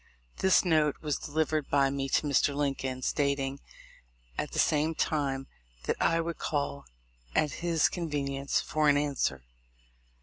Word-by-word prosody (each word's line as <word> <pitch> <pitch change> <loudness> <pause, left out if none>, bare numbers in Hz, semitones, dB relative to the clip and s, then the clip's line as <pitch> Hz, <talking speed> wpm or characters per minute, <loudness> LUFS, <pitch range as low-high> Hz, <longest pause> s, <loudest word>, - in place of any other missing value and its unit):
This 190 0 +4
note 155 -4 +3
was 150 -2 -1
delivered 155 -1 -1
by 140 -1 +3
me 135 0 -2
to 150 - +2
Mr. 140 0 +2
Lincoln, 135 -3 -2
stating, 140 -1 0 0.8
at - - -3
the - - -6
same 155 +1 +2
time, 140 -4 0 0.4
that - - 0
I 165 0 +3
would 165 0 -3
call 140 -1 -2 0.5
at 150 - +2
his 170 -2 +3
convenience 140 -5 -1
for 155 -1 +1
an 145 - +5
answer. 135 - -1
145 Hz, 140 wpm, -29 LUFS, 140-155 Hz, 0.8 s, an